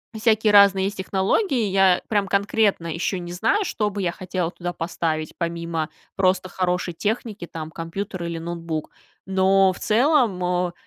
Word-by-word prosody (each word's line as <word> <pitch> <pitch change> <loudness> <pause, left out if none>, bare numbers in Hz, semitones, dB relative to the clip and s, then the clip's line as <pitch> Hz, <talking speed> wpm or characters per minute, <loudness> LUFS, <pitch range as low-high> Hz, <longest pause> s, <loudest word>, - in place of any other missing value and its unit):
Всякие 220 -1 +3
разные 200 -1 +6
есть 200 - -3
технологии. 210 - +1
Я 190 -1 +4
прям 205 -2 +1
конкретно 200 -2 +1
еще 170 +3 -2
не 175 0 -7
знаю, 225 - +1
что 210 - -1
бы 200 0 -4
я 175 -2 0
хотела 180 -2 -3
туда 175 -1 -5
поставить, 160 -2 -3
помимо 170 -2 -3 0.3
просто 185 -1 +1
хорошей 180 -1 -1
техники, 215 -2 -3
там, 160 -1 -6
компьютер 170 +3 -5
или 170 -1 -4
ноутбук. 165 -2 -4 0.4
Но 190 0 +4
в - - -9
целом, 235 - +2
э 180 0 0
185 Hz, 155 wpm, -23 LUFS, 170-205 Hz, 0.4 s, разные